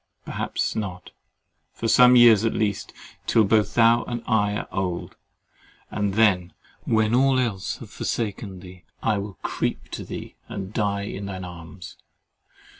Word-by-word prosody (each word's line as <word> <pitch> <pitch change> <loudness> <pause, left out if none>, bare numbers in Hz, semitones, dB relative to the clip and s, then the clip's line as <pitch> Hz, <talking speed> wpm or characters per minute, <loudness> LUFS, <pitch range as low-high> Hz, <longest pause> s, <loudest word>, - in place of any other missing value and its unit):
Perhaps - - -2
not—for 95 +3 -8
some 125 +2 +7
years 115 -4 +7
at 115 - 0
least—till 110 +1 -1
both 105 0 +2
thou 115 0 +5
and 120 -1 -4
I 105 -3 +1
are - - -4
old—and 95 +2 -6
then, 95 -5 +3 0.3
when 110 0 +2
all 135 +1 +4
else 105 -8 -1
have - - -11
forsaken 100 -4 -3
thee, 90 -2 -13 0.2
I 105 -3 +2
will 100 -3 -7
creep - - -2
to - - -5
thee, - - -8
and 95 +1 -6
die 100 -2 0
in 100 0 -5
thine 95 -2 -5
arms. 85 0 -10
105 Hz, 135 wpm, -24 LUFS, 95-115 Hz, 0.3 s, some